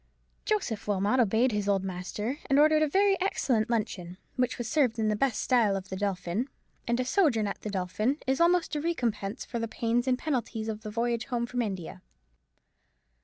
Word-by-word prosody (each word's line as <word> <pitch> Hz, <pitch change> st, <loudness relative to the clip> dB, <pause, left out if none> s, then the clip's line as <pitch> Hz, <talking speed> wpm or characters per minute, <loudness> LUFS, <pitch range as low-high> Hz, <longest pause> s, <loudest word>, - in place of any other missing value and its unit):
Joseph 370 Hz, -, -1 dB
Wilmot 205 Hz, +5 st, +2 dB
obeyed 235 Hz, +2 st, +3 dB
his 205 Hz, -1 st, -1 dB
old 195 Hz, -1 st, +2 dB
master, 195 Hz, +8 st, -4 dB
and 275 Hz, -, +3 dB
ordered 310 Hz, +1 st, +5 dB
a 310 Hz, -, +4 dB
very 390 Hz, +4 st, +3 dB
excellent 245 Hz, -, +1 dB
luncheon, 200 Hz, -6 st, -2 dB, 0.2 s
which 255 Hz, -1 st, 0 dB
was 240 Hz, -, -4 dB
served 245 Hz, -3 st, +2 dB
in 220 Hz, -1 st, +1 dB
the 210 Hz, -, +1 dB
best 250 Hz, 0 st, +1 dB
style 230 Hz, -6 st, +3 dB
of 190 Hz, -1 st, -5 dB
the 190 Hz, -, -4 dB
Dolphin; 195 Hz, +3 st, -2 dB, 0.4 s
and 235 Hz, +1 st, +1 dB
a 255 Hz, -, 0 dB
sojourn 255 Hz, -, +2 dB
at 200 Hz, -, -4 dB
the 215 Hz, -, -4 dB
Dolphin 205 Hz, +7 st, -1 dB
is 265 Hz, +3 st, +1 dB
almost 345 Hz, -1 st, +3 dB
a 295 Hz, -, -1 dB
recompense 235 Hz, -11 st, -2 dB
for 235 Hz, -, -4 dB
the 230 Hz, -, -2 dB
pains 235 Hz, +3 st, 0 dB
and 255 Hz, -1 st, +3 dB
penalties 240 Hz, -6 st, -2 dB
of 215 Hz, -1 st, -4 dB
the 215 Hz, -, -6 dB
voyage 235 Hz, +1 st, -1 dB
home 240 Hz, -3 st, -1 dB
from 245 Hz, +1 st, -2 dB
India. 190 Hz, -4 st, -4 dB
230 Hz, 195 wpm, -29 LUFS, 205-265 Hz, 0.4 s, ordered